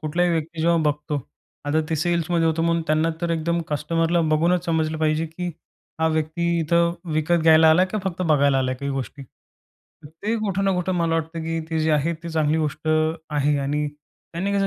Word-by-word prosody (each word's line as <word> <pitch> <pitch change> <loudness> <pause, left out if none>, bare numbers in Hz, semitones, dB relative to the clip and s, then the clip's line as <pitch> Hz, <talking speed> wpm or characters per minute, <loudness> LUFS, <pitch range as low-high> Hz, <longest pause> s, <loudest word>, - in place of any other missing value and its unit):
कुठलाही 170 +3 0
व्यक्ती 165 0 -2
जेव्हा 170 +1 +3
बघतो. 150 0 -4 0.4
आता 150 +2 +1
ते 160 - 0
सेल्समध्ये 170 +1 +1
होतो 160 0 +1
म्हणून 170 0 +1
त्यांना 155 +2 +2
तर 170 -1 -1
एकदम 170 +1 0
कस्टमरला 165 +3 0
बघूनच 170 +3 +2
समजलं 160 -1 0
पाहिजे, 155 +1 +1
की 175 +3 -5 0.5
हा 160 - +3
व्यक्ती 160 +2 -1
इथं 170 +2 +2 0.2
विकत 160 +2 +1
घ्यायला 160 0 +6
आला 180 +4 +5
की 190 +3 -3
फक्त 185 -1 -2
बघायला 145 -4 +3
आलाय 130 0 0
काही 140 +2 -4
गोष्टी. 135 +1 -5 0.8
तर 145 - -10
ते 220 +2 0
कुठं 200 -3 -1
ना 195 - +2
कुठं 180 +1 -1
मला 165 -1 +1
वाटतं, 165 0 -3
की 165 0 -2
ते 160 - 0
जे 155 0 +1
आहे, 150 +3 +1
ती 170 - -6
चांगली 160 -1 +1
गोष्ट 155 0 -3 0.4
आहे 145 0 +1
आणि 145 +2 -1 0.5
त्यांनी 190 +4 -2
कसं 200 -1 +1
160 Hz, 190 wpm, -23 LUFS, 155-170 Hz, 0.8 s, घ्यायला